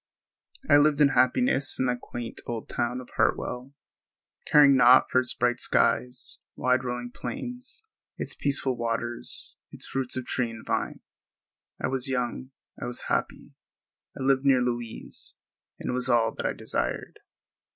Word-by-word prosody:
I 145 - +7
lived 145 0 +4
in 145 -2 +6
happiness 135 - +2
in 130 - +1
that 125 -1 -1
quaint 120 -1 -6
old 115 -2 -4
town 125 +1 -2
of 125 - -14
Hartwell, 125 +3 0 0.8
caring 145 -2 +7
naught 125 0 +6
for 130 - +5
its 125 -2 -2
bright 120 0 +1
skies, 125 0 0 0.2
wide 130 0 +2
rolling 120 -1 -4
plains, 245 - -5 0.3
its - - -2
peaceful 140 -2 0
waters, 120 0 -4 0.2
its - - -5
fruits 130 -1 -1
of 130 - -3
tree 125 -2 -1
and 115 -1 -10
vine. - - -2 0.8
I - - -2
was 130 0 0
young; 125 0 -2 0.3
I - - -3
was 120 - -4
happy; - - -2 0.7
I - - -3
lived 135 0 +3
near 135 -3 +4
Louise; 120 -2 -5 0.4
it - - -4
was 125 0 +1
all 115 -2 +3
that - - -2
I - - -1
desired. - - -3
125 Hz, 150 wpm, -27 LUFS, 120-135 Hz, 0.8 s, I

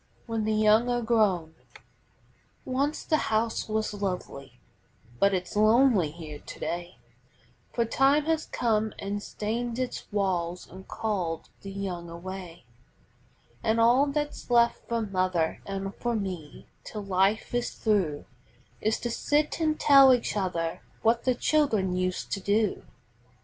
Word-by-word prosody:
WHEN 225 -2 -2
THE 220 - +1
YOUNG 215 +2 +4
ARE 240 0 +1
GROWN 200 -8 +2 1.1
Once 275 +4 -1
the 310 - +2
house 220 +1 0
was 215 0 -1
lovely, 180 - -5 0.6
but 200 - +4
it's 185 0 -3
lonely 215 - +4
here 155 -2 -9
to - - -11
day, 175 +1 -4 0.7
For 235 - 0
time 275 +5 +3
has 320 -1 0
come 220 -2 0
an' 200 +1 -3
stained 230 +3 -3
its 255 -2 -4
walls 180 -4 -1
an' 190 +2 -11
called 180 -7 -3
the 195 - -8
young 185 -3 -5
away; 175 -1 -8 1.0
An' 220 +1 +1
all 240 +5 +5
that's 295 -1 -3
left 235 -1 +3
for 230 -1 0
mother 185 -5 0
an' 195 0 -3
for 240 +3 -2
me 185 -8 -5 0.2
till 210 -1 -6
life 195 +4 +1
is 245 0 0
through 190 -10 0 0.6
Is 220 +1 +1
to 240 - -2
sit 300 +6 0
an' 310 -1 +2
tell 275 -4 +7
each 240 - -3
other 170 -5 -2 0.2
what 230 +1 +2
the 255 -1 +3
children 225 -11 +1
used 185 0 -2
to 200 - -1
do. 205 +1 0
210 Hz, 140 wpm, -27 LUFS, 185-235 Hz, 1.1 s, tell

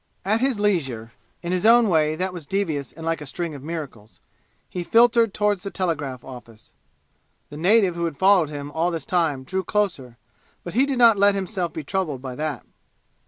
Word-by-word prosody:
At 215 +4 +1
his 260 -5 +1
leisure 135 - -1 0.3
in 170 - -3
his 180 -1 0
own 230 +1 +6
way, 155 -4 +2
that 185 +2 -2
was 170 -5 -8
devious 160 -9 -2
and 160 0 -10
like 165 -1 -1
a - - -6
string 170 +4 -4
of 140 - -9
miracles 140 -9 -8 0.5
he 180 - -5
filtered 230 +3 +4
toward 205 -1 0
the 200 - -6
telegraph 145 -10 -3
office. 120 -4 -13 0.8
The 145 - -8
native 190 +3 +3
who 170 0 -2
had 160 -4 -4
followed 190 -4 +4
him 145 -1 -7
all 165 +3 0
this 165 -4 -4
time 160 -7 0
drew 190 +7 -3
closer, 165 - -2 0.5
but 175 - -7
he 260 +6 +3
did 275 -2 -1
not 230 -3 +6
let 200 0 +5
himself 190 -2 -2
be 160 - -6
troubled 160 -4 -2
by 130 0 -7
that. 150 -1 -4
170 Hz, 195 wpm, -23 LUFS, 145-200 Hz, 0.8 s, own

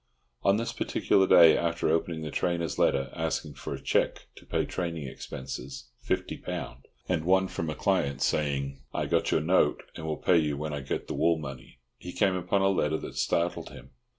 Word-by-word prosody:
On 100 +1 +3
this 115 - -2
particular 95 -1 +2
day, 85 -2 +8
after 85 0 0
opening 80 0 0
the 75 - -5
trainer's 85 -3 -1
letter 70 0 +2
asking 80 -2 -2
for - - -6
cheque - - 0
to - - -15
pay - - 0
training 85 -3 -3
expenses 65 0 -7 0.2
(£50), - - -3 0.3
and 85 -4 0
one 95 +2 +3
from 80 -3 -4
a 75 - -3
client, 70 -8 0
saying 70 -2 -1
"I - - 0
got - - +1
your - - +2
note, 80 -2 +2
and 80 - -6
will 75 - -2
pay 90 -2 +4
you 75 -2 -1
when 75 +1 -4
I 70 - -2
get 65 - -3
the - - -3
wool 85 0 +2
money," 70 -5 -8 0.2
he 90 - -8
came 100 -3 +2
upon 90 +2 0
a 95 - +4
letter 80 -5 +1
that - - -8
startled 85 +1 0
him. 65 - -13
80 Hz, 190 wpm, -28 LUFS, 75-90 Hz, 0.3 s, day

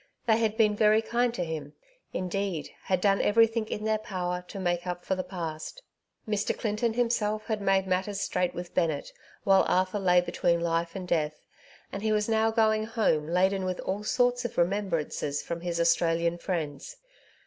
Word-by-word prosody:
They 220 -2 +4
had 220 -1 0
been 210 -2 +4
very 215 +1 +4
kind 240 +2 +1
to 180 - -2
him 155 -3 -5 0.2
— - - -43
^indeed^ 185 -4 -2 0.2
had 185 -1 +1
done 195 0 +3
everything 225 +1 +3
in 210 - -4
their 220 0 +1
power 180 -3 -3
to 200 - -7
make 175 -1 -1
up 175 0 -4
for - - 0
the 185 0 -2
past. 170 - -6 0.4
Mr. 210 -1 -1
Clinton 220 +1 -1
himself 215 -3 0
had 215 -2 -2
made 195 -1 +2
matters 190 +2 -1
straight 180 -3 -1
with 175 0 -6
Bennett 160 -5 0 0.3
while 195 -1 +5
Arthur 185 +3 +1
lay 180 -2 +4
between 175 -1 +1
life 170 +1 -1
and 185 -2 -5
death, 155 -3 -1 0.5
and 195 - -5
he 220 0 0
was 210 -1 +1
now 220 0 +2
going 220 -1 +2
home 215 -10 +1
laden 190 +3 +2
with 185 -1 -2
all 195 +2 -3
sorts 245 +2 +1
of 240 - -5
remembrances 170 -6 -1
from 170 0 -5
his 170 -1 -2
Australian 170 0 +2
friends. 170 - -4
190 Hz, 180 wpm, -28 LUFS, 175-215 Hz, 0.5 s, while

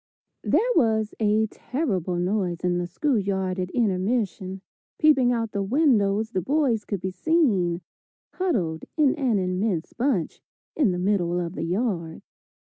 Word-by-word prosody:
There - - +2
was 220 -2 +2
a 215 0 +3
terrible 205 - -2
noise 180 -1 -1
in 180 -1 0
the 175 - -2
school 270 +5 0
yard 190 -1 -2
at 180 0 -2
intermission; 195 -3 -1 0.4
peeping 270 -6 +4
out 230 -2 -1
the 200 - -2
windows 220 -3 +2
the 185 - -1
boys 255 - +1
could 200 - -3
be 185 - -3
seen 190 - +1 0.5
huddled 185 - -1
in 295 -4 +4
an 255 -7 +1
immense 185 -1 -1
bunch, 240 - -1 0.3
in 280 -9 +3
the 180 - -2
middle 180 -2 +1
of 170 -1 -3
the - - -3
yard. 175 -4 -2
200 Hz, 145 wpm, -25 LUFS, 180-245 Hz, 0.5 s, peeping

